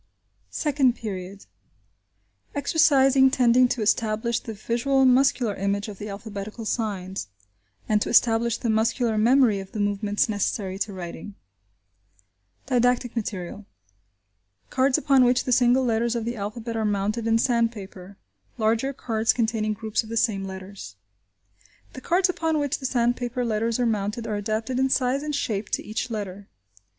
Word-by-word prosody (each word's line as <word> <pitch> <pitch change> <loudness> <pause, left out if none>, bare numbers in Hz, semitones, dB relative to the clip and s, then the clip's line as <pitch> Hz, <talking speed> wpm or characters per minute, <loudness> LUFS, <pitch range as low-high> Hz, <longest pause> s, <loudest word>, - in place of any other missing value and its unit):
SECOND 275 -5 +1
PERIOD: 195 -3 -7 1.1
EXERCISES 275 -3 +4
TENDING 250 -1 +4
TO 240 -2 -2
ESTABLISH 220 +2 0
THE 225 - -8
VISUAL 240 +5 +1
MUSCULAR 255 -3 +3
IMAGE 200 +2 -2
OF 200 - -9
THE 210 - -6
ALPHABETICAL 210 +2 -7
SIGNS: 195 - -3 0.6
AND 210 -1 +2
TO - - -1
ESTABLISH 235 0 +3
THE 235 - -1
MUSCULAR 225 0 +1
MEMORY 235 -2 +4
OF 195 0 -10
THE 215 - -4
MOVEMENTS 205 0 0
NECESSARY 200 -2 -2
TO 210 - -2
WRITING 185 +1 -8 1.3
Didactic 245 -1 +1
Material. 200 -2 -5 1.0
Cards 260 0 +3
upon 275 -2 +4
which 245 0 +3
the 255 - -3
single 250 +1 +4
letters 235 0 0
of 230 -1 -2
the 235 +1 -3
alphabet 220 +2 -5
are 220 - -1
mounted 210 +2 -1
in 225 0 +3
sandpaper; 215 -6 -2 0.4
larger 230 +4 +1
cards 225 -4 0
containing 220 -2 0
groups 215 0 -2
of 220 - -12
the 230 - -3
same 200 -4 +1
letters. 190 - -9 1.0
The 260 - -9
cards 360 +6 +2
upon 325 -3 -1
which 285 -2 -1
the 265 - -2
sandpaper 245 0 0
letters 225 +1 -1
are 245 - +2
mounted 215 +1 -2
are 215 - -2
adapted 220 +4 -2
in 265 0 +2
size 260 +1 +1
and 300 0 -3
shape 215 -7 -2
to - - -2
each 215 +4 -3
letter. 205 -3 -6
225 Hz, 150 wpm, -24 LUFS, 205-250 Hz, 1.3 s, EXERCISES